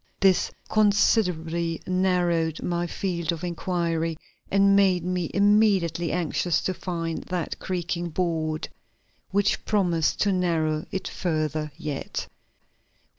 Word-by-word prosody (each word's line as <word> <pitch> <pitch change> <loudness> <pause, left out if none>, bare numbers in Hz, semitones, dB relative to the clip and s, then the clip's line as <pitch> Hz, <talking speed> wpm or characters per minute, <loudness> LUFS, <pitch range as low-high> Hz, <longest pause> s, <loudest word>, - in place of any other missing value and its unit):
This 190 -1 +4 0.2
considerably 170 -6 +2
narrowed 180 -3 +1
my 175 0 -1
field 170 -2 -2
of 170 0 -5
inquiry, 170 -2 -1 0.3
and 195 0 +4
made 190 -3 +4
me 180 -2 -1
immediately 200 -5 +3
anxious 175 -1 0
to 185 - 0
find 165 -3 -3
that 180 -2 -3
creaking 175 -1 -3
board 160 -2 -1 0.6
which 200 +1 +1
promised 175 -7 +1
to 205 - +3
narrow 160 -4 0
it 190 - -3
further 155 -3 -2
yet. 150 -3 -4
175 Hz, 110 wpm, -25 LUFS, 165-185 Hz, 0.6 s, This